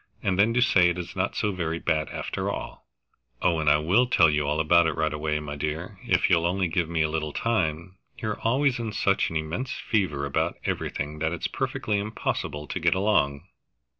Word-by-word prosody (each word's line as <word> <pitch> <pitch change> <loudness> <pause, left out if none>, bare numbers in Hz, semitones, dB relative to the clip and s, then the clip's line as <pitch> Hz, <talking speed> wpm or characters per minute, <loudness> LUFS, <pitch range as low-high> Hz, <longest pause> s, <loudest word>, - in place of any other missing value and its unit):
"And 95 -2 0
then 105 +3 +5
to 125 - +3
say 95 -9 +4
it 90 - -2
is 90 0 -6
not 95 +1 -1
so 105 - 0
very 85 -3 -2
bad 80 -2 0
after - - -3
all!" - - -6 0.5
"Oh, 85 -2 +2
I 75 -1 +4
will 95 +12 +3
tell 80 -9 +5
you 75 -1 0
all 75 +2 0
about 85 +2 +4
it 80 - -1
right 80 -1 0
away, 75 0 -1
my 75 -1 -6
dear, 80 +6 -4
if 90 0 +3
you'll 85 -2 +3
only 95 +1 0
give 85 0 -1
me 85 -2 +1
a - - +2
little 75 -1 -2
time. 90 -5 -1 0.2
You're 110 -1 -3
always 130 +2 +2
in 115 -2 -4
such 100 -1 +1
an 80 - -7
immense 80 +12 -3
fever 85 -11 -1
about 70 - -1
everything 75 +2 -3
that 80 +2 0
it's 85 - -4
perfectly 105 -1 -2
impossible 100 -7 -3
to 90 - -4
get 85 0 +2
along." 95 -9 +1
85 Hz, 205 wpm, -26 LUFS, 75-100 Hz, 0.5 s, then